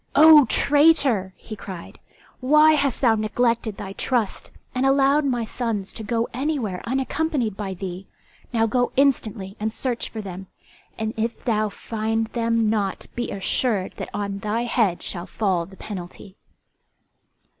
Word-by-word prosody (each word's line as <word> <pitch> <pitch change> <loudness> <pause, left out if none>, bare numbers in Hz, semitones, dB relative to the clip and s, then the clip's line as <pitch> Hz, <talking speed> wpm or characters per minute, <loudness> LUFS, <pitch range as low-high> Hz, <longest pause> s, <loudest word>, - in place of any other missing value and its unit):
"O 305 -1 +9
traitor," 280 - +3
he 215 - -9
cried, 190 -4 -9 0.4
"why 305 +4 +5
has 280 -4 +1
thou 240 -4 +4
neglected 225 0 0
thy 195 -1 -6
trust 235 -2 -1 0.2
and 255 - -1
allowed 275 +2 +3
my 245 -4 0
sons 220 -3 -3
to - - -8
go 230 +2 -1
anywhere 255 -8 -2
unaccompanied 265 - -1
by 195 -2 -4
thee? 185 0 -6 0.4
Now 225 -2 +2
go 245 +2 +1
instantly 220 -8 +1
and 220 +1 -1
search 240 +1 -3
for 225 - -7
them, 190 -2 -7 0.5
and 220 0 -2
if 225 +1 -3
thou 215 -3 +1
find 225 +2 -2
them 230 -1 +1
not 205 -3 -1
be 240 - -3
assured 200 0 0
that - - -5
on 200 -1 -3
thy 215 +3 -1
head 225 -7 +1
shall 175 0 -5
fall 185 -6 -1
the 190 0 -15
penalty." 190 -1 -8
225 Hz, 145 wpm, -23 LUFS, 200-255 Hz, 0.5 s, O